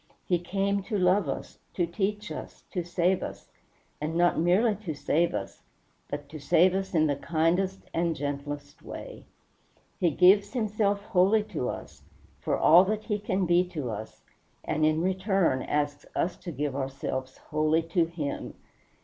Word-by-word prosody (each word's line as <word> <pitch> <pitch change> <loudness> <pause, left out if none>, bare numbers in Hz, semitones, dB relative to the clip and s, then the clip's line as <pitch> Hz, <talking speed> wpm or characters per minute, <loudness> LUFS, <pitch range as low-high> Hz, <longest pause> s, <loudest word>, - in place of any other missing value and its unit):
He 175 -2 +2
came 195 +3 0
to 215 - -1
love 185 -3 +3
us, - - -5 0.2
to 175 - +2
teach 205 +4 -2
us, - - -8
to 180 -3 -2
save 175 +2 +1
us; - - -7 0.5
and 155 +2 -2
not 175 +1 +3
merely 190 +7 +3
to 180 -8 -5
save 165 0 +1
us, 100 - -5 0.5
but 145 - -5
to 155 - -8
save 170 +6 +4
us 190 0 -2
in 155 -1 +4
the 145 -2 +1
kindest 170 +6 0
and 165 0 +1
gentlest 145 +1 -5
way. - - -9 0.7
He 180 -4 +3
gives 185 - +5
himself 210 -4 0
wholly 200 +3 +3
to 125 - -1
us, - - -8 0.4
for - - 0
all 170 +4 +7
that 215 +2 -1
he 210 -2 -1
can 190 -2 0
be 175 +1 +4
to 150 -9 -4
us, 110 +1 -8 0.4
and 155 0 -1
in 155 +1 +1
return 190 -6 +1
asks 145 -1 -2
us 175 - 0
to 175 - -7
give 145 -1 -2
ourselves 130 -1 -4
wholly 155 +2 +1
to 165 +1 +1
him. 160 -4 -5
175 Hz, 165 wpm, -28 LUFS, 150-195 Hz, 0.7 s, all